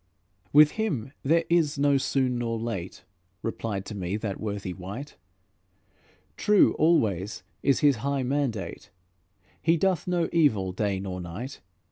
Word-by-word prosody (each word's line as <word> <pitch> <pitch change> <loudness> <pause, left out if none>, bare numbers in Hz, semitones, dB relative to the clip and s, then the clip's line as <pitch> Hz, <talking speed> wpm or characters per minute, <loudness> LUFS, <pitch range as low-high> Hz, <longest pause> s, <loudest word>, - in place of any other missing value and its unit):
"With 150 +1 +7
Him 135 - -2
there 165 +4 +3
is 160 -4 +2
no 140 0 +3
soon 130 -2 0
nor 115 -1 -1
late," 110 -6 -5 0.4
Replied 110 -3 -3
to - - -7
me 95 +1 -2
that 105 -3 -4
worthy 100 -3 -4
wight; 100 +11 -8 1.2
"True 210 -1 +4
always 110 - +2 0.2
is 140 -1 +2
His 145 -4 +4
high 140 +4 -1
mandate; 115 -8 -2 0.7
He 165 +1 +3
doth 185 0 +1
no 175 -2 +1
evil, 110 - +3
day 100 0 -1
nor 95 -1 -5
night. 100 +11 -7
120 Hz, 135 wpm, -27 LUFS, 100-145 Hz, 1.2 s, With